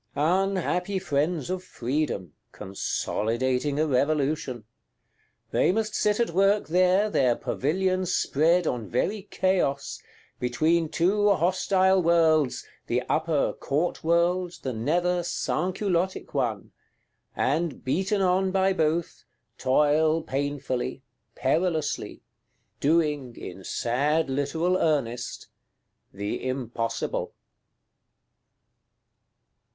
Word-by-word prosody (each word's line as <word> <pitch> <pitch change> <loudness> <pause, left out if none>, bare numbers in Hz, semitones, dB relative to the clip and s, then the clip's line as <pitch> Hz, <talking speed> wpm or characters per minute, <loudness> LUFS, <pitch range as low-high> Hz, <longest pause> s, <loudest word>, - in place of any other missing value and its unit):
Unhappy 185 +3 0
friends 160 -2 -1
of 185 0 -3
Freedom; 120 - -3 0.2
consolidating 125 +8 -1
a 155 - +3
Revolution! 140 -3 0 0.9
They - - +3
must 215 +2 -1
sit 210 0 +1
at 235 -6 +1
work 195 +1 +2
there, 185 +4 +3
their 130 - +2
pavilion 185 +9 -1
spread 170 +1 +2
on 120 -7 -2
very 195 - -1
Chaos; 175 -8 0 0.4
between 155 +7 +1
two 205 +6 +2
hostile 190 +1 +3
worlds, 160 -5 +3 0.2
the 125 +1 0
Upper 155 -2 +1
Court 155 +6 -2
world, 175 +2 +1
the 130 - -2
Nether 175 +10 0
Sansculottic 185 +1 -1
one; 115 -8 -2 0.6
and, 155 +2 -1
beaten 190 +9 0
on 190 +1 +2
by 190 0 +2
both, 160 -1 -1 0.3
toil 155 +4 +3
painfully, 135 -2 -3 0.3
perilously,—doing, 150 -2 -2
in 95 +1 -9
sad 140 +8 0
literal 160 +7 0
earnest, 125 -8 -1 0.7
"the 100 +1 -4
impossible." 120 -3 -3
160 Hz, 90 wpm, -26 LUFS, 135-180 Hz, 0.9 s, a